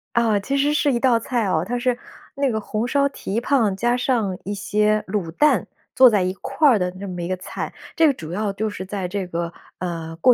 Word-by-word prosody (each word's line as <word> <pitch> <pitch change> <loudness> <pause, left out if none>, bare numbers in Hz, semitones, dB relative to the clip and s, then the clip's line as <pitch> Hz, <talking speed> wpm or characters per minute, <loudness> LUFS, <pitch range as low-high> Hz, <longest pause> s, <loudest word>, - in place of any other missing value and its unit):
啊， 225 -3 +3
其 275 +7 -2
实 290 +2 +2
是 300 -1 +2
一 240 - +1
道 245 -3 +3
菜 235 -1 -1
哦， 175 -4 +1
它 245 - -1
是 245 0 0 0.4
那 280 -1 +1
个 220 - -1
红 215 +2 -2
烧 280 +2 +2
蹄 225 -5 -3
髈 240 -6 +2
加 240 +4 +1
上 230 -7 0
一 205 - -3
些 210 +1 +1
卤 190 -4 -2
蛋， 295 - +3 0.3
做 255 -1 +8
在 210 -4 +2
一 185 0 -1
块 270 +3 +2
儿 230 -5 +4
的 180 -1 0
那 200 - -6
么 180 -2 -5
一 170 - -3
个 185 - -1
菜。 185 - -6 0.2
这 325 -2 +5
个 285 - +3
主 170 -9 -8
要 205 +2 -1
就 215 +2 -2
是 205 -2 -6
在 190 -1 -3
这 190 0 -3
个， 170 -1 -3 0.3
呃， 165 -2 -4
过 250 +9 +6
215 Hz, 255 characters per minute, -22 LUFS, 185-250 Hz, 0.4 s, 做